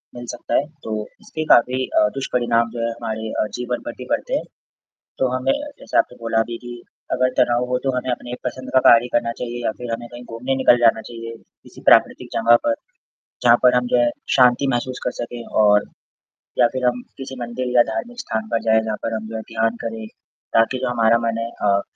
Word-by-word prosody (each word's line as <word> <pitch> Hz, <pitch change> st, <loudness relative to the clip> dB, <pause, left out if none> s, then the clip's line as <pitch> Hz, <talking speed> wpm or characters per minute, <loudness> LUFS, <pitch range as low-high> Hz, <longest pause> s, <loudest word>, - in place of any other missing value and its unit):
मिल 120 Hz, 0 st, -7 dB
सकता 120 Hz, -, -4 dB
है। 145 Hz, -, +3 dB, 0.2 s
तो 110 Hz, -1 st, -3 dB, 0.3 s
इसके 155 Hz, 0 st, -5 dB
काफ़ी 130 Hz, +2 st, +3 dB
अ, 105 Hz, -, +5 dB
दुष्परिणाम 120 Hz, -3 st, +1 dB
जो 120 Hz, -, -5 dB
है -, -, 0 dB
हमारे 110 Hz, -1 st, -5 dB
अ, -, -, +1 dB
जीवन 125 Hz, 0 st, -3 dB
पर -, -, -3 dB
भी -, -, -8 dB
बढ़ते -, -, -1 dB
हैं। -, -, -1 dB, 0.8 s
तो 130 Hz, -, +2 dB
हमें 130 Hz, -, +1 dB, 0.3 s
जैसा -, -, -1 dB
आपने 125 Hz, -, +1 dB
बोला 115 Hz, -1 st, +1 dB
भी 115 Hz, -, -3 dB
कि 120 Hz, -1 st, -9 dB, 0.3 s
अगर 130 Hz, 0 st, +2 dB
तनाव 120 Hz, +1 st, +3 dB
हो 125 Hz, 0 st, +1 dB
तो 135 Hz, -, +2 dB
हमें 125 Hz, 0 st, -2 dB
अपनी 125 Hz, 0 st, -4 dB
पसंद 130 Hz, +1 st, -5 dB
का -, -, +7 dB
कार्य 120 Hz, +1 st, +7 dB
करना 115 Hz, -1 st, +1 dB
चाहिए 120 Hz, 0 st, -4 dB
या -, -, +2 dB
फ़िर 120 Hz, -1 st, -6 dB
हमें 120 Hz, +1 st, -5 dB
कहीं 120 Hz, 0 st, -9 dB
घूमने 125 Hz, +4 st, -3 dB
निकल 130 Hz, -2 st, +5 dB
जाना 115 Hz, -1 st, +4 dB
चाहिए 115 Hz, 0 st, -7 dB
किसी -, -, -18 dB
प्राकृतिक -, -, +4 dB
जगह 115 Hz, +1 st, +5 dB
पर। 290 Hz, -, +3 dB, 0.7 s
जहाँ 120 Hz, -1 st, +7 dB
पर 125 Hz, 0 st, +6 dB
हम 125 Hz, 0 st, +1 dB
जो -, -, +7 dB
है 120 Hz, 0 st, +3 dB, 0.3 s
शांति 125 Hz, +1 st, +5 dB
महसूस 125 Hz, +1 st, -2 dB
कर -, -, 0 dB
सकें। 120 Hz, 0 st, -5 dB, 0.2 s
और 105 Hz, 0 st, +5 dB, 0.8 s
या -, -, +7 dB
फ़िर 130 Hz, -1 st, -2 dB
हम 125 Hz, 0 st, +1 dB, 0.2 s
किसी 135 Hz, 0 st, -7 dB
मंदिर 120 Hz, +1 st, -4 dB
या 120 Hz, -, +7 dB
धार्मिक 240 Hz, -, -5 dB
स्थान 110 Hz, -, -3 dB
पर 115 Hz, -, +1 dB
जाएँ 110 Hz, 0 st, +4 dB
जहाँ 110 Hz, -1 st, -2 dB
पर 115 Hz, -, -2 dB
हम 110 Hz, 0 st, -5 dB
जो 110 Hz, -, -7 dB
है 110 Hz, -, -3 dB
ध्यान 115 Hz, +1 st, 0 dB
करें 110 Hz, -1 st, -5 dB, 0.5 s
ताकि 115 Hz, +3 st, +3 dB
जो 130 Hz, -1 st, -1 dB
हमारा 115 Hz, -1 st, +3 dB
मन 115 Hz, 0 st, -1 dB
है 115 Hz, 0 st, -3 dB
अ, 100 Hz, -1 st, +3 dB
120 Hz, 220 wpm, -21 LUFS, 115-125 Hz, 0.8 s, का